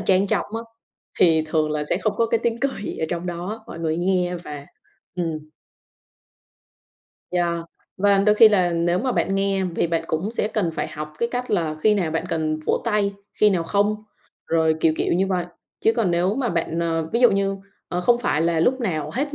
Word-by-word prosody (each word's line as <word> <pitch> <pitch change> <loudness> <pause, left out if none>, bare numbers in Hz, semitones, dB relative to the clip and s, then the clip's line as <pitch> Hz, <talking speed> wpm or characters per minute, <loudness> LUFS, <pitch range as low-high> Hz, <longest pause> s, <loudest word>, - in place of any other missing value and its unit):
trang 190 +1 +3
trọng 195 -4 0
á, 230 - -4 0.6
thì 160 -3 +5
thường 155 -1 0
là 150 -1 -1
sẽ 175 - -1
không 210 +2 0
có 230 - +2
cái 230 0 +1
tiếng 235 0 -1
cười 270 -7 -2
ở 160 - 0
trong 175 +1 -3
đó, 185 +6 -5
mọi 165 - -8
người 160 -1 -1
nghe 180 -1 +1
và 145 -1 -8 0.5
ừm. 160 -3 -3 1.8
Yeah, 175 -1 0 0.4
và 200 0 +3
đôi 210 +1 +4
khi 220 0 +8
là 185 -4 +2
nếu 170 +1 +1
mà 255 -1 0
bạn 195 - 0
nghe 195 -1 +1
vì 175 -1 -1
bạn 165 0 -1
cũng 165 +7 -2
sẽ 220 -2 -1
cần 205 -6 -1
phải 155 - -3
học 150 0 -7
cái 235 - 0
cách 250 0 -3
là 165 -6 0
khi 215 +5 +4
nào 180 -6 0
bạn 160 - -2
cần 155 -1 -1
vỗ - - +1
tay, 210 -3 +1 0.3
khi 210 - +6
nào 180 -4 +1
không, 210 +4 0 0.4
rồi 160 -1 +2
kiểu 160 -1 +4
kiểu - - 0
như 190 +3 +2
vậy. 180 -2 0 0.4
Chứ 225 - +3
còn 225 -6 +1
nếu 180 +4 +1
mà 260 -3 -1
bạn 165 -1 -1
à, 165 -1 0
ví 235 - +1
dụ 245 - +7
như, 195 0 0 0.3
ờ, 180 - -2
không 240 +6 +3
phải 150 -10 0
là 165 -1 +1
lúc 260 +9 +2
nào 155 -9 -2
hết 285 +3 -2
180 Hz, 215 wpm, -23 LUFS, 165-210 Hz, 1.8 s, khi